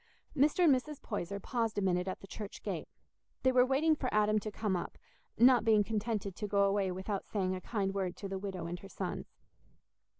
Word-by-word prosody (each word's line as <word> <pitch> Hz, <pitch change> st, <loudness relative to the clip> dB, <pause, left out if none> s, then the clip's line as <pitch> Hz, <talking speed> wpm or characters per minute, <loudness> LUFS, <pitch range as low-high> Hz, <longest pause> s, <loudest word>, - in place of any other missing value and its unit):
Mr. 300 Hz, +5 st, +3 dB
and 310 Hz, -5 st, +7 dB
Mrs. 280 Hz, +3 st, -2 dB
Poyser 200 Hz, -2 st, -4 dB
paused 230 Hz, 0 st, -2 dB
a -, -, +2 dB
minute 180 Hz, -1 st, +1 dB
at 185 Hz, -, -4 dB
the 195 Hz, -, -11 dB
church 205 Hz, 0 st, -8 dB
gate: -, -, -3 dB, 0.6 s
they 260 Hz, -, +5 dB
were 250 Hz, -1 st, +6 dB
waiting 280 Hz, +5 st, +3 dB
for 260 Hz, -4 st, -2 dB
Adam 215 Hz, 0 st, +3 dB
to 215 Hz, +1 st, -5 dB
come 205 Hz, -2 st, -1 dB
up, 175 Hz, -, -4 dB, 0.4 s
not 245 Hz, +1 st, +6 dB
being 220 Hz, -2 st, +5 dB
contented 210 Hz, -2 st, -2 dB
to 210 Hz, -, -3 dB
go 200 Hz, 0 st, +3 dB
away 195 Hz, -1 st, +2 dB
without 190 Hz, +2 st, -4 dB
saying 190 Hz, -3 st, -1 dB
a 185 Hz, -, -4 dB
kind 195 Hz, -1 st, -1 dB
word 190 Hz, -3 st, -2 dB
to 200 Hz, -, -5 dB
the 195 Hz, 0 st, -4 dB
widow 190 Hz, -3 st, -5 dB
and 175 Hz, +1 st, -4 dB
her 195 Hz, -, -11 dB
sons. -, -, -5 dB
205 Hz, 210 wpm, -33 LUFS, 195-235 Hz, 0.6 s, and